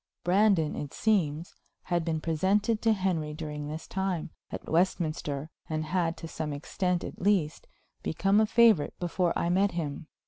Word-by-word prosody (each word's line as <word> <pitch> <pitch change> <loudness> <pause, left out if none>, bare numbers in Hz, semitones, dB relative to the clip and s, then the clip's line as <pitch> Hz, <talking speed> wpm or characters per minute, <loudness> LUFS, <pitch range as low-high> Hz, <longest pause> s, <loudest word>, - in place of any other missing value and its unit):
Brandon, 185 -4 +3
it 145 - -6
seems, 170 -7 +1 0.3
had 175 -2 0
been 160 -1 -1
presented 195 +8 +1
to 225 - +3
Henry 175 -6 -1
during 150 -2 -5
this 155 +2 -6
time, 190 -4 -2 0.2
at - - -7
Westminster, 155 -4 0 0.2
and 155 0 -1
had, 170 0 0
to 165 - -7
some 155 -1 -4
extent 180 +4 -1
at - - -7
least, 180 -6 +1 0.3
become 195 +6 +2
a 220 - +3
favorite 225 -8 +4
before 175 0 0
I 170 - 0
met 195 +3 +2
him. 155 -2 -4
170 Hz, 160 wpm, -29 LUFS, 155-195 Hz, 0.3 s, favorite